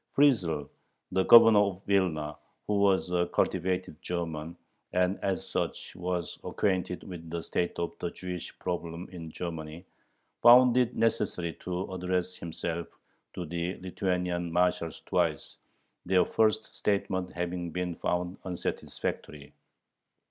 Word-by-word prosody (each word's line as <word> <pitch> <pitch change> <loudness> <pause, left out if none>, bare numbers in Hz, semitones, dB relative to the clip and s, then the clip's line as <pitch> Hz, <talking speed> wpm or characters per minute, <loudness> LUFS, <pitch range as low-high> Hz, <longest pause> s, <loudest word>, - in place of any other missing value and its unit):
Friesel, 90 - +3 0.4
the 95 - +2
Governor 115 -2 +9
of 100 -2 0
Vilna, 80 -7 +1 0.3
who 105 -1 +1
was 95 -2 +3
a 90 -1 +2
cultivated 90 -3 0
German, 85 -2 -4 0.4
and 90 +1 +2
as 95 -1 -1
such - - -3
was 90 -1 -3
acquainted 95 -2 -1
with 85 -3 -8
the 85 0 -4
state 85 - -1
of 85 - -1
the 85 - -2
Jewish 90 -1 -7
problem 85 -1 -4
in 85 -3 -7
Germany, 80 0 -6 0.6
found 125 +1 +8
it 125 -1 +2
necessary 105 -6 0
to 90 +1 -4
address 90 0 -1
himself 85 -1 -4 0.5
to 90 - -4
the 85 +3 -3
Lithuanian 90 -2 -1
marshals 90 -1 +1
twice, - - 0 0.5
their 90 0 +3
first 110 0 +1
statement 95 -3 0
having 90 0 -3
been 90 +1 -2
found 90 +2 -2
"unsatisfactory." 75 -4 -4
90 Hz, 125 wpm, -29 LUFS, 85-95 Hz, 0.6 s, Governor